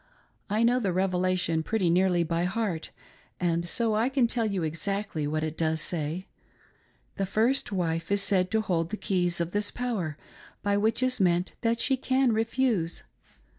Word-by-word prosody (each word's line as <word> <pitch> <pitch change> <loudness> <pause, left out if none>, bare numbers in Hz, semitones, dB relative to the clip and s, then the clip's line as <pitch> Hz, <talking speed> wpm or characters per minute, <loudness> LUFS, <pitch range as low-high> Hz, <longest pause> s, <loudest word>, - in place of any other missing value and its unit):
I 215 +3 +1
know 245 +2 +4
the 200 -6 0
Revelation 185 -2 +1
pretty 195 +2 0
nearly 180 -1 +3
by 170 +1 -1
heart 185 -4 -2 0.5
and 170 -1 0
so 230 +2 +1
I 225 +4 +2
can 265 -2 +2
tell 230 -1 0
you 195 -4 -1
exactly 165 0 -2
what 155 +1 -1
it 155 0 -3
does 160 -1 0
say. 165 +2 -3 0.9
The 195 - -1
first 230 +6 +1
wife 165 -2 -1
is 200 0 +4
said 185 -3 +2
to 220 +1 +1
hold 170 -5 -1
the 215 - -4
keys 175 -4 0
of 170 0 -1
this 205 +1 0
power, 205 -12 -3 0.5
by 205 0 +2
which 220 +4 +1
is 255 -1 +2
meant 180 -1 +2
■that 230 0 +1
she 265 +2 +2
can 260 -1 +2
refuse. 225 -6 0
190 Hz, 170 wpm, -27 LUFS, 170-225 Hz, 0.9 s, know